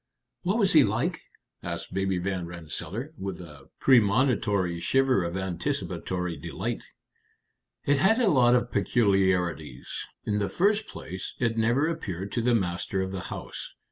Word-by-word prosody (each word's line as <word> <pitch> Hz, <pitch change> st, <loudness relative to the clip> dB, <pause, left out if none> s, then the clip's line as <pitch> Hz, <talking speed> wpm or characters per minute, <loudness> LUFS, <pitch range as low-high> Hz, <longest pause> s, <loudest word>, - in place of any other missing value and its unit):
"What 190 Hz, +5 st, +1 dB
was 195 Hz, -4 st, +3 dB
he 155 Hz, -3 st, +8 dB
like?" -, -, 0 dB, 0.4 s
asked -, -, -5 dB
Baby 95 Hz, 0 st, 0 dB
Van 90 Hz, -1 st, -2 dB
Rensselaer, 85 Hz, -, -6 dB
with 95 Hz, -2 st, -4 dB
a 75 Hz, -6 st, -12 dB
premonitory 105 Hz, -7 st, +3 dB
shiver 135 Hz, -1 st, +2 dB
of 85 Hz, +2 st, -3 dB
anticipatory 90 Hz, -1 st, -3 dB
delight. -, -, -4 dB, 1.0 s
"It 140 Hz, 0 st, +3 dB
had 210 Hz, +9 st, +4 dB
a 240 Hz, -, +3 dB
lot 125 Hz, -4 st, +5 dB
of 120 Hz, 0 st, 0 dB
peculiarities. 90 Hz, -, +1 dB, 0.2 s
In 105 Hz, 0 st, 0 dB
the 100 Hz, -2 st, 0 dB
first 205 Hz, -, +2 dB
place, 95 Hz, +1 st, -7 dB
it 115 Hz, -2 st, 0 dB
never 120 Hz, +7 st, +2 dB
appeared 100 Hz, -, -4 dB
to 120 Hz, -, 0 dB
the 120 Hz, +1 st, +3 dB
master 95 Hz, -1 st, -1 dB
of 95 Hz, -, -4 dB
the 95 Hz, -, -4 dB
house. -, -, -7 dB
100 Hz, 145 wpm, -27 LUFS, 90-130 Hz, 1.0 s, he